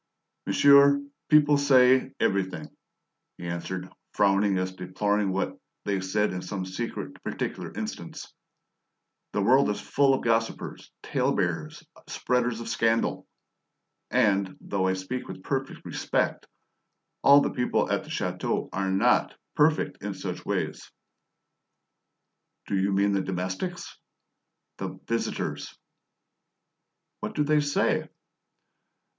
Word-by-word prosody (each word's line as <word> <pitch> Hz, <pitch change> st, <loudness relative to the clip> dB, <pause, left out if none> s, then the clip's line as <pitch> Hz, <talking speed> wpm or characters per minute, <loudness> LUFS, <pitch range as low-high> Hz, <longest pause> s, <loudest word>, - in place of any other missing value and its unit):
"Monsieur, 140 Hz, 0 st, +6 dB, 0.3 s
people 150 Hz, -1 st, +5 dB
say 130 Hz, -2 st, +5 dB
everything," 95 Hz, -1 st, -1 dB, 0.6 s
he 85 Hz, -, -8 dB
answered, 85 Hz, +2 st, -4 dB, 0.3 s
frowning 100 Hz, 0 st, +3 dB
as 95 Hz, 0 st, -1 dB
if 95 Hz, -, -18 dB
deploring 100 Hz, +2 st, 0 dB
what 95 Hz, +1 st, -2 dB, 0.3 s
they 100 Hz, -2 st, 0 dB
said 100 Hz, +2 st, 0 dB
in 90 Hz, -, -4 dB
some 95 Hz, 0 st, -4 dB
secret, 105 Hz, +6 st, -6 dB
particular -, -, -4 dB
instance. -, -, -6 dB, 1.0 s
"The 105 Hz, -, 0 dB
world 130 Hz, +4 st, +5 dB
is 105 Hz, -, -1 dB
full 140 Hz, -1 st, +2 dB
of -, -, -4 dB
idle 115 Hz, -, +3 dB
gossipers, 115 Hz, 0 st, -4 dB
tale -, -, 0 dB
bearers, -, -, -2 dB, 0.2 s
spreaders 125 Hz, -2 st, 0 dB
of 115 Hz, -, -6 dB
scandal! 115 Hz, 0 st, 0 dB, 0.8 s
And, 95 Hz, -2 st, +2 dB
though 95 Hz, -2 st, -1 dB
I 95 Hz, -, +2 dB
speak 95 Hz, +7 st, -5 dB
with 95 Hz, 0 st, -9 dB
perfect 135 Hz, -1 st, -3 dB
respect, -, -, -1 dB, 0.7 s
all 140 Hz, +1 st, +8 dB
the -, -, 0 dB
people 125 Hz, -, 0 dB
at -, -, 0 dB
the -, -, -14 dB
chateau -, -, -2 dB
are 95 Hz, 0 st, -1 dB
not 95 Hz, +1 st, +2 dB, 0.2 s
perfect 155 Hz, +1 st, +2 dB
in 100 Hz, -1 st, -3 dB
such 95 Hz, -, -5 dB
ways." -, -, -3 dB, 1.7 s
"Do 100 Hz, -, -2 dB
you 95 Hz, +1 st, +1 dB
mean 100 Hz, +1 st, +2 dB
the 100 Hz, -1 st, +1 dB
domestics?" 95 Hz, -, -4 dB, 0.8 s
"The -, -, -5 dB
visitors!" -, -, -3 dB, 1.4 s
"What -, -, -5 dB
do 150 Hz, -, +2 dB
they 150 Hz, +1 st, +3 dB
say?" 145 Hz, -1 st, +1 dB
105 Hz, 125 wpm, -27 LUFS, 95-130 Hz, 1.7 s, all